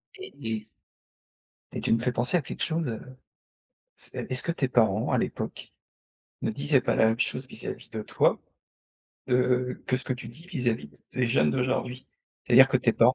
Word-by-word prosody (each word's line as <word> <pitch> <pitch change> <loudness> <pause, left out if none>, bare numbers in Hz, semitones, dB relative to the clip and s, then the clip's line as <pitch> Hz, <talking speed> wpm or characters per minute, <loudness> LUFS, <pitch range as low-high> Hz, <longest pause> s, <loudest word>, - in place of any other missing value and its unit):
Et 385 -1 -9
et 110 -3 -3 1.1
et - - -3
tu - - +2
me 115 - +3
fais 125 +2 0
penser 125 +8 +1
à - - 0
quelque - - -5
chose, 160 -3 0
heu, 110 - -4 1.0
c'est - - -7
est-ce 130 - -1
que 170 - 0
tes 145 -5 0
parents, 110 -5 +2
à - - +3
l'époque, - - -4 0.7
ne - - +1
disaient 140 +4 +2
pas - - +1
la 110 - +5
même 115 +1 +1
chose 130 +1 -1
vis-à-vis 110 - -7
de 110 -1 -4
toi, - - +2 0.9
heu, 125 0 +1
que 130 - +2
ce 130 - -6
que 130 - -1
tu 125 - -6
dis 165 - -12
vis-à-vis 120 - -1 0.2
des 130 -1 +1
jeunes 75 -10 +3
d'aujourd'hui? 125 - -1 0.4
C'est-à-dire 130 +2 +8
que 135 - +3
tes 120 -2 +2
parents, 120 +3 +5
125 Hz, 185 wpm, -27 LUFS, 115-130 Hz, 1.1 s, C'est-à-dire